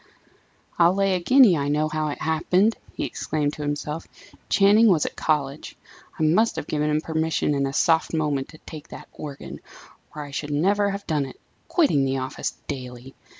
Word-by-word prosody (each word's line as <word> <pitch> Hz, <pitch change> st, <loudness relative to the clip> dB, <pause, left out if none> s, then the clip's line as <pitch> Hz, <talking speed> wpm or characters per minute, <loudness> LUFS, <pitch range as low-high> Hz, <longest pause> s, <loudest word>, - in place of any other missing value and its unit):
"I'll 170 Hz, +2 st, +5 dB
lay 195 Hz, -1 st, +2 dB
a 180 Hz, -, +1 dB
guinea 245 Hz, 0 st, +6 dB
I 140 Hz, -2 st, -1 dB
know 150 Hz, +1 st, +1 dB
how 155 Hz, 0 st, -2 dB
it 145 Hz, -, -4 dB
happened!" 180 Hz, +7 st, +2 dB, 0.2 s
he -, -, -2 dB
exclaimed 150 Hz, -1 st, -2 dB
to -, -, -8 dB
himself. 150 Hz, +2 st, -4 dB, 0.4 s
"Channing 210 Hz, +3 st, +5 dB
was 175 Hz, -7 st, +3 dB
at -, -, -5 dB
college 145 Hz, -2 st, -2 dB, 0.4 s
I -, -, -1 dB
must 185 Hz, +9 st, +3 dB
have -, -, -4 dB
given 150 Hz, 0 st, -1 dB
him 150 Hz, 0 st, +1 dB
permission 160 Hz, -1 st, 0 dB
in 140 Hz, -1 st, 0 dB
a -, -, -3 dB
soft 160 Hz, +3 st, +2 dB
moment 150 Hz, -4 st, -1 dB
to 155 Hz, -, -13 dB
take 155 Hz, -1 st, -9 dB
that -, -, -11 dB
organ, 145 Hz, -2 st, -8 dB, 0.6 s
or 150 Hz, -, -5 dB
I 145 Hz, -, -10 dB
should 145 Hz, +2 st, -4 dB
never 200 Hz, +8 st, +2 dB
have 200 Hz, 0 st, -5 dB
done 150 Hz, -4 st, -1 dB
it, 130 Hz, -, -13 dB, 0.3 s
quitting 285 Hz, -, +2 dB
the 135 Hz, 0 st, 0 dB
office 130 Hz, 0 st, -4 dB
daily! 125 Hz, 0 st, -7 dB
155 Hz, 190 wpm, -24 LUFS, 145-180 Hz, 0.6 s, guinea